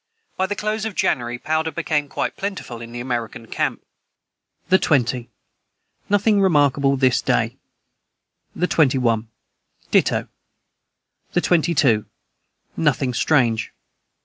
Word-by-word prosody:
By 190 - 0
the 205 - -3
close 215 +1 -2
of 220 -3 -4
January, 120 0 0
powder 155 +4 -1
became 155 -3 -1
quite - - -2
plentiful 195 - -5
in 115 0 -9
the 120 - -6
American 120 -2 -4
camp.] - - -2 0.8
the 190 - +4
20. 125 -4 +1 0.8
Nothing 205 0 +3
remarkable 145 -6 +3
this 130 -2 +3
day. - - 0 1.0
the 180 - +1
21. 125 -9 +2 0.6
Ditto. - - +2 1.1
the 175 - +2
22. 160 -11 +2 0.7
Nothing 135 -4 +1
strange. 120 -4 +1
145 Hz, 110 wpm, -21 LUFS, 120-175 Hz, 1.1 s, the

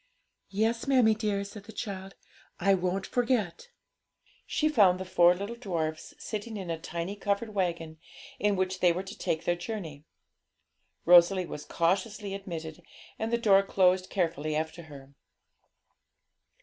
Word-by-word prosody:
'Yes, 225 +5 0
mammie 250 -5 +5
dear,' 210 -2 -1
said 200 0 -10
the 220 - -10
child; 195 -3 -6 0.4
'I 195 +1 +4
won't 185 +1 -1
forget.' 245 - -1 0.8
She 310 - +1
found 200 -11 +4
the 185 - -4
four 175 -1 +5
little 200 +5 -5
dwarfs 165 -9 -4
sitting 215 +1 -5
in 185 -4 -5
a 165 - -3
tiny 170 +4 -4
covered 205 +2 -2
waggon, 170 -5 -2 0.4
in 205 -1 +2
which 185 0 -1
they 180 -1 +5
were 180 +3 -3
to 195 +2 -9
take 160 - -2
their 175 - +2
journey. 175 -6 -6 1.0
Rosalie 180 +2 +6
was 150 -3 -7
cautiously 200 +4 -1
admitted, 170 -4 -6 0.4
and 220 +1 -2
the 235 - +3
door 200 -4 +5
closed 185 -1 +2
carefully 165 -4 -1
after 160 +2 -3
her. 140 -1 -12
190 Hz, 145 wpm, -29 LUFS, 170-210 Hz, 1.0 s, Rosalie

